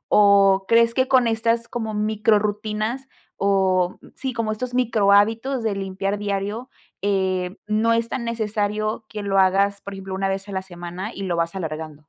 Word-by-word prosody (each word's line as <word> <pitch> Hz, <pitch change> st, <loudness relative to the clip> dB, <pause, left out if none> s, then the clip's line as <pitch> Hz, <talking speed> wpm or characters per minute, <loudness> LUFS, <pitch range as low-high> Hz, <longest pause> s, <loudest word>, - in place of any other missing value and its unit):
o 200 Hz, -1 st, +5 dB
crees 230 Hz, 0 st, +4 dB
que 260 Hz, 0 st, +1 dB
con 260 Hz, -2 st, +4 dB
estas, 230 Hz, +1 st, 0 dB
como 220 Hz, -3 st, -4 dB
micro 215 Hz, +1 st, +2 dB
rutinas, 215 Hz, +5 st, -2 dB, 0.3 s
oh, 190 Hz, -2 st, +2 dB, 0.2 s
sí, 260 Hz, -1 st, -4 dB
como 230 Hz, -2 st, -1 dB
estos 245 Hz, +3 st, -4 dB
micro 220 Hz, -5 st, +2 dB
hábitos 225 Hz, +5 st, +3 dB
de 215 Hz, -3 st, 0 dB
limpiar 195 Hz, +1 st, -3 dB
diario, 205 Hz, +4 st, -3 dB, 0.3 s
eh, 190 Hz, -2 st, 0 dB
no 215 Hz, +2 st, +2 dB
es 230 Hz, 0 st, 0 dB
tan 245 Hz, -, -3 dB
necesario 215 Hz, -1 st, -2 dB
que 210 Hz, -1 st, -6 dB
lo 195 Hz, -1 st, +1 dB
hagas, 195 Hz, +1 st, +3 dB
por 200 Hz, -, -8 dB
ejemplo, 195 Hz, 0 st, -7 dB
una 195 Hz, 0 st, -1 dB
vez 195 Hz, +1 st, -3 dB
a 200 Hz, -, -8 dB
la 190 Hz, -, -2 dB
semana 180 Hz, +2 st, -7 dB
y 195 Hz, -, -5 dB
lo 175 Hz, -2 st, -1 dB
vas 170 Hz, +2 st, -1 dB
alargando. 155 Hz, -4 st, -5 dB
205 Hz, 180 wpm, -22 LUFS, 195-225 Hz, 0.3 s, o